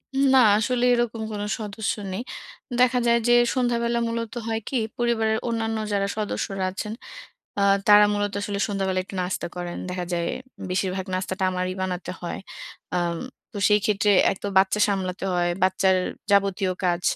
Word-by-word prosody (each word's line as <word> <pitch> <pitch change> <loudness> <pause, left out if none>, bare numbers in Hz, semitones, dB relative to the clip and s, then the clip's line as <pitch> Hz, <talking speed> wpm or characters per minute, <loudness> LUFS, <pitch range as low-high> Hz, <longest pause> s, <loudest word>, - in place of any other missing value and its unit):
উম 275 +1 +3
না, - - +8 0.2
আসলে 240 +3 0
এরকম 235 -2 0
কোন 205 - -4 0.2
সদস্য 210 0 -3 0.2
নেই। 190 - -3 0.6
দেখা 250 0 +4
যায় 235 0 +4
যে 240 - +5 0.2
সন্ধ্যাবেলা 235 -1 +1
মূলত 230 -1 -3
হয় 225 0 -1
কি? 265 - 0 0.2
পরিবারের 225 -2 +1
অন্যান্য 225 -1 -1 0.2
যারা 200 0 +1
সদস্যরা 195 -2 -2
আছেন, 210 +3 -5 0.7
আ - - +2 0.3
তারা 210 0 +8
মূলত 205 0 -1
আসলে 200 -1 -3
সন্ধ্যাবেলা 190 -2 -1
একটু 195 - -10
নাস্তা 180 -1 -3
করেন। 175 -1 -5
দেখা 180 -1 -3
যায় 170 -1 0 0.4
বেশিরভাগ 185 0 -1
নাস্তাটা 185 +1 -3
আমারই 185 0 -2
বানাতে 180 -1 -3
হয়। 175 - -4 0.6
আম 175 -1 0 0.3
তো 220 - -7
সেই 210 0 +4
ক্ষেত্রে 205 0 +2 0.2
এক - - -5
তো - - -1
বাচ্চা 190 +2 +3
সামলাতে 190 -2 -2
হয়, 175 0 +1
বাচ্চার 190 0 +3 0.4
যাবতীয় 195 -1 +2
কাজ 175 0 +1
200 Hz, 160 wpm, -24 LUFS, 185-225 Hz, 0.7 s, না